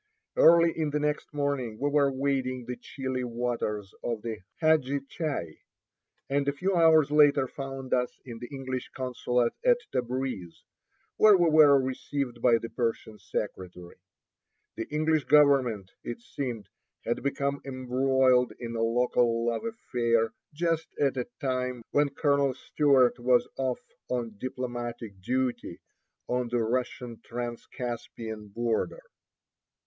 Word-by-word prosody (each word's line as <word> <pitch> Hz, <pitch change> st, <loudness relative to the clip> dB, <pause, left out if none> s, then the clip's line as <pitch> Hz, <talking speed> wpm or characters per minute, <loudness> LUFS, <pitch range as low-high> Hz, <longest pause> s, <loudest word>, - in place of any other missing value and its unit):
Early 170 Hz, 0 st, +6 dB
the 150 Hz, 0 st, -1 dB
next 150 Hz, 0 st, -2 dB
morning 140 Hz, -6 st, -2 dB
we 145 Hz, -, 0 dB
were 145 Hz, -1 st, +3 dB
wading 130 Hz, -2 st, -1 dB
the 125 Hz, -, -4 dB
chilly 130 Hz, -1 st, -4 dB
waters 115 Hz, -4 st, -3 dB
of 115 Hz, -3 st, -3 dB
the 115 Hz, -2 st, -4 dB, 0.2 s
Hadji 150 Hz, -4 st, +2 dB
Chai, 145 Hz, -, -4 dB, 0.7 s
and 140 Hz, 0 st, 0 dB
a -, -, +4 dB
few 185 Hz, +7 st, -1 dB
hours 160 Hz, -3 st, +5 dB
later 145 Hz, -3 st, +5 dB
found 135 Hz, -1 st, -6 dB
us 125 Hz, -1 st, 0 dB
in 115 Hz, -3 st, -8 dB
the 120 Hz, -, -7 dB
English 130 Hz, -2 st, -5 dB
consulate 125 Hz, -2 st, 0 dB
at -, -, +5 dB
Tabreez, 125 Hz, -8 st, -3 dB, 0.5 s
where 215 Hz, -2 st, +7 dB
we 170 Hz, -2 st, +3 dB
were 150 Hz, -3 st, +7 dB
received 130 Hz, -1 st, -3 dB
by 120 Hz, -2 st, +5 dB
the 115 Hz, 0 st, -7 dB
Persian 115 Hz, -2 st, -3 dB
secretary. 95 Hz, -3 st, -6 dB, 0.8 s
The 115 Hz, -, -4 dB
English 155 Hz, 0 st, +1 dB
government, 135 Hz, -10 st, +4 dB
it 120 Hz, -, -5 dB
seemed, 120 Hz, -3 st, -5 dB, 0.4 s
had 120 Hz, -, -1 dB
become 140 Hz, 0 st, -1 dB
embroiled 130 Hz, -2 st, +2 dB
in 115 Hz, -1 st, -6 dB
a 115 Hz, -, -1 dB
local 115 Hz, 0 st, +2 dB
love 120 Hz, -, -1 dB
affair 120 Hz, -, 0 dB, 0.2 s
just 165 Hz, +1 st, -1 dB
at 140 Hz, -2 st, +2 dB
a 125 Hz, -2 st, -2 dB
time 125 Hz, -3 st, -2 dB
when 145 Hz, 0 st, +3 dB
Colonel 140 Hz, -2 st, +1 dB
Stewart 135 Hz, -3 st, +3 dB
was 125 Hz, 0 st, +3 dB
off 130 Hz, -2 st, -2 dB, 0.2 s
on 120 Hz, -3 st, -2 dB
"diplomatic 120 Hz, -5 st, -5 dB
duty" 125 Hz, -4 st, -2 dB, 0.5 s
on 125 Hz, 0 st, 0 dB
the 120 Hz, -1 st, 0 dB
Russian 120 Hz, 0 st, -2 dB
Transcaspian 120 Hz, -2 st, -6 dB
border. 120 Hz, -, -1 dB
130 Hz, 130 wpm, -28 LUFS, 120-140 Hz, 0.8 s, where